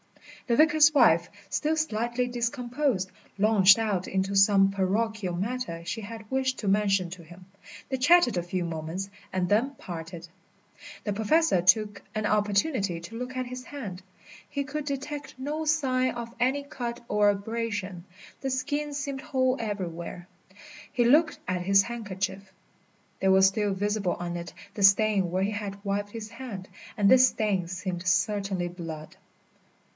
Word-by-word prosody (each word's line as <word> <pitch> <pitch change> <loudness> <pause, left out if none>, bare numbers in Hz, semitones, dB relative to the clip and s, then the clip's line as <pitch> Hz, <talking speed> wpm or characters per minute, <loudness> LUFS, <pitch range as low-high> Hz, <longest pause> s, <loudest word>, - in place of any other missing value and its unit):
The 235 - +2
vicar's 310 0 +6
wife, 170 - +5 0.2
still 305 +10 0
slightly 240 -4 -1
discomposed, 240 -3 -1 0.3
launched 200 -1 +6
out 210 -5 -1
into 190 +1 -1
some 195 0 +5
parochial 195 0 -1
matter 200 -3 -3
she 225 +6 -4
had 220 0 -9
wished 265 0 0
to 210 - -4
mention 195 -2 +2
to 180 -2 -9
him. 175 +3 -14 0.4
They 265 - -2
chatted 275 - +5
a 175 - +1
few 175 0 -2
moments 165 +4 -5 0.2
and 185 -1 0
then 235 +9 +1
parted. 170 -3 -8 0.8
The 205 - 0
Professor 220 - +2
took 205 +2 +3
an 215 0 -1
opportunity 205 - +1
to 175 +7 -10
look 250 +2 -5
at 255 - -1
his 250 +1 -7
hand. 205 -11 -7 0.5
He 280 -1 -2
could 295 +2 -4
detect 290 +1 -5
no 295 +4 -3
sign 260 -5 +1
of 235 -1 -6
any 265 +4 +1
cut 240 -3 -5
or 210 -1 +3
abrasion, 205 -3 -3 0.4
the 270 - -2
skin 290 +3 -2
seemed 280 -1 -4
whole 260 -3 +1
everywhere. 175 -5 -5 0.6
He 245 -3 +2
looked 310 +6 +4
at 180 -1 -1
his 195 +2 +4
handkerchief. 195 -4 -5 0.7
There 190 - +4
was 190 0 +6
still 200 +1 +1
visible 205 -1 -1
on 175 0 -5
it 175 +1 -6 0.2
the 205 - -3
stain 195 -1 +4
where 185 +1 0
he 200 - 0
had 200 -1 -5
wiped 200 +1 -1
his 220 0 -7
hand, 230 -6 -7 0.3
and 205 -2 +3
this 255 +3 +7
stain 200 -7 -1
seemed 180 0 -4
certainly 190 0 +1
blood. 165 -3 -8
210 Hz, 155 wpm, -27 LUFS, 190-255 Hz, 0.8 s, this